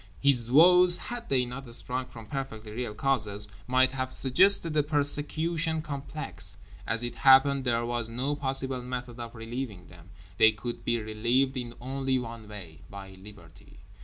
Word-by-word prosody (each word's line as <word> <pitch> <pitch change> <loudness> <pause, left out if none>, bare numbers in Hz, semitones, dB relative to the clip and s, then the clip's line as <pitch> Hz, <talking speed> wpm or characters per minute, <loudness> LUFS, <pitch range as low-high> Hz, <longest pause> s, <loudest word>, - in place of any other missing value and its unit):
His 125 -5 +2
woes, 175 +5 +7
had 240 -1 -7
they 130 -2 +2
not 125 0 -8
sprung 125 +1 -4
from 115 -3 -12
perfectly 110 -4 -6
real 115 -1 -5
causes, 105 -6 -1 0.2
might 130 +1 +3
have 130 -1 -4
suggested 165 +5 +4
a 150 - +4
persecution 155 +2 0
complex. 120 - -2 0.3
As 110 +2 -1
it 120 - -4
happened 135 0 +5
there 120 -1 0
was 120 -1 -3
no 130 +5 -2
possible 135 -2 -2
method 125 -1 -6
of 115 0 -7
relieving 115 -5 -6
them—they 95 +4 0
could 120 +3 -6
be 120 0 0
relieved 120 +5 0
in 120 -2 -5
only 135 +1 -1
one 115 -3 -7
way: 95 -7 -10
by 100 -1 -9
Liberty. 95 -1 -15
125 Hz, 155 wpm, -28 LUFS, 110-135 Hz, 0.3 s, woes